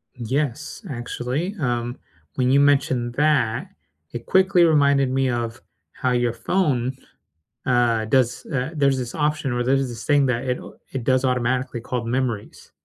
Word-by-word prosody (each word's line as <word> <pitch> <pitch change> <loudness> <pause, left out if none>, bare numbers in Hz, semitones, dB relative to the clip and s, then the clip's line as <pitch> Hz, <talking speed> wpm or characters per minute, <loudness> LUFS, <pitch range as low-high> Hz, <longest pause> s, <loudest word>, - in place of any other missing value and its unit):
Yes, 135 - -3
actually, 130 - -3
um, 120 -2 -2 0.4
when 130 0 +2
you 140 - +5
mentioned 130 -4 +2
that, 140 - +1 0.4
it 120 0 -6
quickly 190 -2 +4
reminded 140 -4 +4
me 130 0 +1
of 120 -1 -3 0.3
how 130 - -1
your 120 -1 +1
phone, 130 -4 0 0.7
uh, 120 -3 +2
does, 125 +1 +1
uh 135 0 -2
There's 140 -2 +2
this 125 -2 -5
option, 150 -3 0
or 120 0 0
there's 135 +1 +1
this 115 -2 -8
thing 145 -2 +3
that 125 0 -1
it 125 -1 -1 0.3
it 130 -4 -4
does 130 0 +2
automatically 125 0 0
called 120 -1 -4
Memories. 120 -4 -3
130 Hz, 150 wpm, -23 LUFS, 120-140 Hz, 0.7 s, you